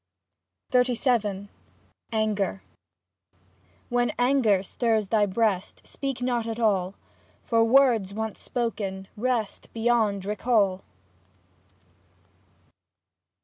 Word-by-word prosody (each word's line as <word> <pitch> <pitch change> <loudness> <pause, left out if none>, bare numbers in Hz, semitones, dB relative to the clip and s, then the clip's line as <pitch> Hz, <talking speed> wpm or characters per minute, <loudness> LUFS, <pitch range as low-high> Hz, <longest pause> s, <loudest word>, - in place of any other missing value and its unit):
XXXVII 235 -5 +1 0.6
ANGER 210 -3 -1 1.3
When 245 -1 +1
anger 245 -6 +3
stirs 220 -1 0
thy 210 -2 +3
breast. 200 -1 -1
Speak 270 -2 -4
not 240 -2 0
at 225 0 -4
all 195 -4 +1 0.5
(For 230 -1 +2
words, 230 -5 +4
once 220 +1 -5
spoken, 205 -6 -3
rest 235 -2 -2
Beyond 225 -4 +1
recall). 205 -2 +1
220 Hz, 80 wpm, -26 LUFS, 200-240 Hz, 1.3 s, words